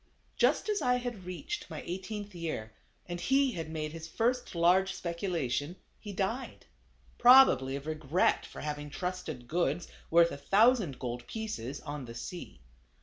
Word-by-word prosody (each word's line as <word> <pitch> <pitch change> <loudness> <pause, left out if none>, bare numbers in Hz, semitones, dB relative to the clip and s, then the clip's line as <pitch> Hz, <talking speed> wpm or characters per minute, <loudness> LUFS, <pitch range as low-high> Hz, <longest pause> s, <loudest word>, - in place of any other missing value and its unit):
Just - - +2
as 420 -1 0
I 250 - +3
had 245 -6 -4
reached 185 - -5
my - - -6
eighteenth 205 +3 -5
year, 155 -11 -4 0.3
and 175 0 -5
he 270 +6 +3
had 165 -6 -5
made 155 -1 -3
his 160 0 -7
first 245 +5 -1
large 185 +3 +4
speculation, 170 -4 -2 0.2
he 210 - -7
died; 200 +7 -3 0.5
probably 240 - +7
of 140 +1 -6
regret 155 +2 +1
for - - -9
having 150 -1 -4
trusted 170 -7 -5
goods, 170 +1 0 0.2
worth 170 0 +5
a - - -5
thousand 205 - +3
gold 120 -1 -5
pieces, 145 - -5
on 145 -2 -6
the 115 -1 -9
sea. 170 - -7
175 Hz, 150 wpm, -31 LUFS, 150-210 Hz, 0.5 s, probably